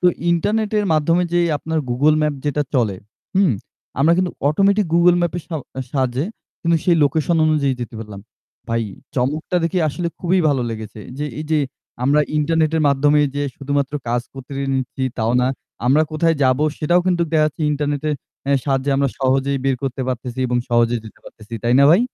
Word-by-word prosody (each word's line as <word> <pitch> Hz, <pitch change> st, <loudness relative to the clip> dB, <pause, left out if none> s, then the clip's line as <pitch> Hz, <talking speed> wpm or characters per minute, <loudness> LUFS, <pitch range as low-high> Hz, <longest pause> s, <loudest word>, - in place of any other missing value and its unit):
তো 180 Hz, -, +3 dB, 0.2 s
ইন্টারনেটের 210 Hz, +4 st, +1 dB
মাধ্যমে 165 Hz, +3 st, +2 dB
যে 175 Hz, -, +3 dB, 0.2 s
আপনার 160 Hz, +2 st, -2 dB
Google 145 Hz, +5 st, +3 dB
Map 150 Hz, -1 st, +1 dB
যেটা 145 Hz, 0 st, 0 dB
চলে 110 Hz, -7 st, +1 dB, 0.4 s
হুম? 190 Hz, -8 st, +4 dB, 0.5 s
আমরা 155 Hz, +4 st, +5 dB
কিন্তু 180 Hz, -1 st, 0 dB, 0.2 s
অটোমেটিক 200 Hz, +6 st, +3 dB
Google 175 Hz, +1 st, +5 dB
Map 175 Hz, -, 0 dB
এর -, -, -8 dB
স -, -, -39 dB, 0.4 s
সাহায্যে 130 Hz, +1 st, 0 dB, 0.4 s
কিন্তু 170 Hz, 0 st, +3 dB
সেই 175 Hz, -2 st, +4 dB
লোকেশন 155 Hz, +4 st, +1 dB
অনুযায়ী 145 Hz, -4 st, +2 dB
যেতে 120 Hz, -, -6 dB
পারলাম। 105 Hz, -3 st, -8 dB, 0.5 s
ভাই 115 Hz, 0 st, 0 dB, 0.3 s
চমকটা 150 Hz, +7 st, -1 dB
দেখে 170 Hz, +2 st, 0 dB
আসলে 170 Hz, +4 st, -2 dB
খুবই 185 Hz, +1 st, +2 dB
ভালো 135 Hz, -4 st, +1 dB
লেগেছে। 110 Hz, -1 st, -7 dB, 0.2 s
যে 150 Hz, -, -2 dB, 0.2 s
এই -, -, -4 dB
যে, 155 Hz, -, +3 dB, 0.5 s
আমরা 145 Hz, +3 st, +4 dB, 0.2 s
ইন্টারনেটের 160 Hz, +1 st, +1 dB
মাধ্যমে 145 Hz, +2 st, +3 dB, 0.2 s
যে 145 Hz, -, 0 dB
শুধুমাত্র 140 Hz, 0 st, -1 dB, 0.2 s
কাজ 120 Hz, +1 st, +1 dB
করতে 135 Hz, +1 st, -10 dB, 0.2 s
নিচ্ছি 130 Hz, 0 st, -3 dB, 0.2 s
তাও 110 Hz, +1 st, +1 dB
না। 125 Hz, -, +2 dB, 0.4 s
আমরা 145 Hz, +5 st, +5 dB
কোথায় 165 Hz, +1 st, +2 dB
যাবো 130 Hz, +3 st, +3 dB
সেটাও 175 Hz, +4 st, +3 dB
কিন্তু 175 Hz, -2 st, +2 dB
দেখাচ্ছে 155 Hz, 0 st, +1 dB
ইন্টারনেটের 145 Hz, +1 st, -1 dB, 0.4 s
এ -, -, +4 dB
সাহায্যে 135 Hz, 0 st, 0 dB
আমরা 140 Hz, 0 st, +2 dB
সহজেই 135 Hz, +1 st, +1 dB
বের 135 Hz, -1 st, +2 dB
করতে 135 Hz, 0 st, -3 dB
পারতেছি 125 Hz, 0 st, -4 dB
এবং 125 Hz, 0 st, 0 dB
সহজেই 120 Hz, -1 st, +2 dB
যেতে 110 Hz, -, -13 dB
পারতেছি। 110 Hz, +1 st, -11 dB
তাই 120 Hz, +1 st, +3 dB
না 140 Hz, -, +7 dB
ভাই? 175 Hz, +6 st, +6 dB
145 Hz, 175 wpm, -20 LUFS, 130-165 Hz, 0.5 s, না